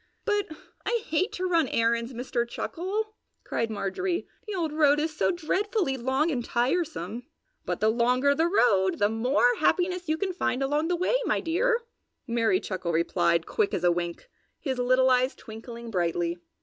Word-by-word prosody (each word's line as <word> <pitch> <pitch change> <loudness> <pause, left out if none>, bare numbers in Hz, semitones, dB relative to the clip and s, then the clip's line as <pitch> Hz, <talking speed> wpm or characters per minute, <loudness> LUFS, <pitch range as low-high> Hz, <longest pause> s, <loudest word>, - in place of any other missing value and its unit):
"But 415 -2 +1 0.4
I 470 -2 0
hate 330 +6 0
to 370 - -3
run 335 -5 +2
errands, 230 +1 +1
Mister 245 0 -2
Chuckle!" 390 - -3 0.3
cried 230 - -2
Marjorie. 225 - -2 0.2
"The 420 - -3
old 325 -4 -1
road 295 -1 +4
is 310 0 -2
so - - +2
dreadfully 365 - 0
long 265 +6 0
and 245 -4 -1
tiresome!" 245 - -1 0.4
"But - - -2
the 215 - +4
longer 250 +4 +3
the 320 +4 +2
road 195 - +3
the 205 0 +3
more 255 - +3
happiness 360 -2 +1
you 315 - +2
can 380 +1 -2
find 260 -6 -1
along 295 +4 +1
the 355 - +1
way, 365 +8 +1
my - - +1
dear!" 460 +8 +1 0.4
Merry 235 +8 +2
Chuckle 185 - -3
replied, 170 0 +1
quick 200 - 0
as 175 - -3
a 175 - +5
wink, 175 - -3 0.3
his 265 -4 -3
little 255 +1 +3
eyes 255 +1 +2
twinkling 230 +1 -9
brightly. 175 -2 -1
265 Hz, 170 wpm, -27 LUFS, 230-350 Hz, 0.4 s, a